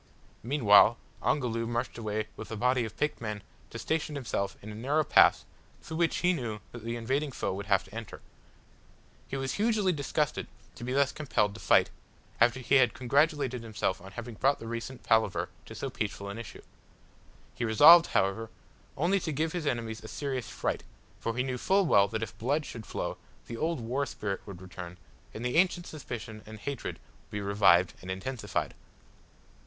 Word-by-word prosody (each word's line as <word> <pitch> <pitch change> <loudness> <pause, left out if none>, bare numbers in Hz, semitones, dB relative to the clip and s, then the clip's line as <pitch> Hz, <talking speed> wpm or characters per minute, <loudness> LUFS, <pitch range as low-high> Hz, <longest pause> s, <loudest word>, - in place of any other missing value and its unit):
Meanwhile 115 -3 +6 0.2
Ongoloo 115 -5 0
marched 120 0 -2
away 110 -1 -2
with - - -8
a 110 - -4
body 125 +2 +2
of 110 - -9
picked 150 -4 -1
men 105 -3 -4 0.3
to - - -7
station 155 +3 -2
himself 105 -7 -2
in 105 - -7
a - - -7
narrow 140 +8 +1
pass - - +5 0.4
through 160 - -6
which 170 -1 +2
he 180 - +5
knew 120 -9 -3
that 120 -2 -9
the 115 +1 -3
invading 135 +5 -1
foe 120 - -2
would 100 +1 -6
have 100 -2 +3
to 95 - -17
enter. 115 -2 -7 1.1
He 135 - -4
was 135 0 -2
hugely 210 -3 +2
disgusted 150 0 -1 0.3
to - - -10
be 125 - -3
thus 140 0 +3
compelled 105 -9 0
to 110 - -10
fight, - - +4 0.5
after 120 +2 +4
he 140 +3 +4
had 125 -4 +4
congratulated 140 -1 +1
himself 110 -5 -2
on 95 +1 -11
having 120 +1 -6
brought 135 +6 +2
the - - -9
recent 115 +3 -5
palaver 110 -3 +2 0.2
to - - -9
so - - -4
peaceful 100 0 -4
an 100 +3 -6
issue. 115 - -9 0.9
He - - -4
resolved, 150 +10 +8
however, 100 +4 0 0.5
only 180 +6 +2
to 165 - -3
give 155 +3 -1
his 170 -4 -2
enemies 115 -4 -2
a - - -8
serious 130 -2 -3
fright, - - -2 0.4
for 115 +1 -3
he 125 - +2
knew 130 -1 -3
full 195 +6 +3
well 100 -10 +5
that 110 +2 -3
if - - -6
blood 145 +6 0
should 115 -3 -8
flow, - - -3 0.3
the 115 - -6
old 160 +5 -1
war 130 +5 -1
spirit 100 -2 -4
would 95 -2 -9
return, 90 -1 -8 0.3
and 115 - -6
the 125 +5 0
ancient 175 -1 +3
suspicion 120 -8 -7
and 110 0 -9
hatred 140 +3 -4 0.3
be 105 0 -4
revived 100 -3 +4
and 90 - -9
intensified. 105 +1 -3
120 Hz, 185 wpm, -30 LUFS, 110-140 Hz, 1.1 s, resolved